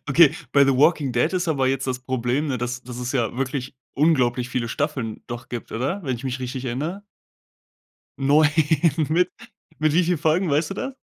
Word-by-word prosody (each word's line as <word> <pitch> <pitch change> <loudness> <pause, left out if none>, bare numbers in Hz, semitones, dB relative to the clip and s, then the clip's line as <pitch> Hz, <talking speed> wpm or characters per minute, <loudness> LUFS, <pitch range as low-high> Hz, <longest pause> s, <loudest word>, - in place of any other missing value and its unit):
okay 150 +1 +6 0.2
bei 140 -1 +6
The 135 -1 +2
Walking 145 -1 +3
Dead 125 +9 +1
ist 180 -2 -1
aber 135 -4 +1
jetzt 135 0 0
das 130 -1 -2
Problem, 130 +3 -1
ne, 130 - -1
das 125 +1 -4
das 125 0 -8
es 125 0 -3
ja 120 -4 0
wirklich 135 0 -3 0.2
unglaublich 125 -5 +2
viele 120 -2 -2
Staffeln 125 -4 -3
doch 120 0 -7
gibt, 120 -2 -6
oder? 150 - -2
Wenn 130 -5 -2
ich 130 - -11
mich 130 0 -2
richtig 130 +1 -5
erinnere. 155 +11 -3 1.2
9, 145 +3 +4 0.6
mit 175 +3 +2 0.5
mit 155 -1 +2
wie 180 +2 +3
vielen 175 0 0
Folgen, 160 +4 +1
weißt 150 +4 +1
du - - -3
das? 265 +5 -4
135 Hz, 195 wpm, -23 LUFS, 125-155 Hz, 1.2 s, okay